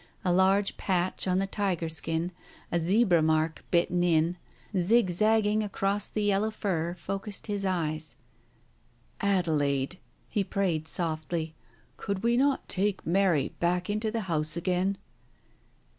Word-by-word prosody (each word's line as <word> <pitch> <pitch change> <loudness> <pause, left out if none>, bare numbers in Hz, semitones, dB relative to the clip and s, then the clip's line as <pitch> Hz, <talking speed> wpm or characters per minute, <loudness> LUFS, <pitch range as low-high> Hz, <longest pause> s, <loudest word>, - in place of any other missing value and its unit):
A 180 - +3
large 190 +2 +3
patch 185 0 0
on 185 0 +2
the 195 - +1
tiger 195 -4 -1
skin, 160 +2 0 0.4
a 170 - +2
zebra 180 0 +3
mark 155 0 +1
bitten 175 0 +2
in, 165 0 +2 0.4
zig 190 +2 +3
zagging 215 +2 +2
across 200 -1 0
the 210 - -2
yellow 205 +1 +2
fur, 175 -5 -2
focussed 195 +3 -5
his 205 -2 -1
eyes.... 155 -6 -2 1.0
"Adelaide," 160 -6 +1 0.3
he 205 - 0
prayed 175 -5 -1
softly, 160 -1 -2 0.4
"could 200 0 -3
we 235 +1 +3
not 275 +2 +1
take 195 +1 0
Mary 175 -4 +2
back 180 +2 0
into 215 +1 -1
the 225 +1 -2
house 160 -4 -2
again 185 +3 0
185 Hz, 130 wpm, -28 LUFS, 165-200 Hz, 1.0 s, A